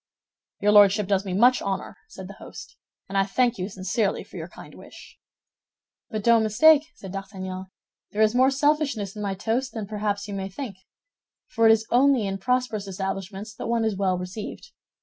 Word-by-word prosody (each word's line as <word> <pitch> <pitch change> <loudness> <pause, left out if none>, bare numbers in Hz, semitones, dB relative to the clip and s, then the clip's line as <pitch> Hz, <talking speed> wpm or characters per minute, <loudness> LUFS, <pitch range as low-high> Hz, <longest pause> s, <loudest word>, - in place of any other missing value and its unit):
"Your 210 - +4
Lordship 205 0 +6
does 195 0 +1
me 185 - -3
much 245 +6 +4
honor," 195 -1 -4
said 440 - -10
the - - -11
host, - - -11 0.3
"and 195 - -8
I 195 - +4
thank 240 +3 0
you 185 +2 -3
sincerely 195 +2 -1
for - - -17
your - - -6
kind - - -13
wish." - - -14 0.9
"But 215 -2 -4
don't 235 0 +5
mistake," 285 +8 +5
said 195 -10 -10
D'Artagnan, 190 -1 -6 0.4
"there 215 +1 +1
is 215 0 +3
more 255 +2 +4
selfishness 275 -8 0
in 210 - -6
my 200 -2 -2
toast 235 +5 -2
than 220 -3 -4
perhaps 205 0 -3
you 205 - -6
may 195 -1 -4
think—for 225 - -5
it - - +8
is 225 0 +3
only 260 -2 +4
in 195 0 -3
prosperous 245 -2 -1
establishments 195 +2 -5
that - - -6
one 230 -1 +1
is 220 -2 0
well 190 -2 0
received. 180 +4 -7
210 Hz, 185 wpm, -25 LUFS, 195-235 Hz, 0.9 s, it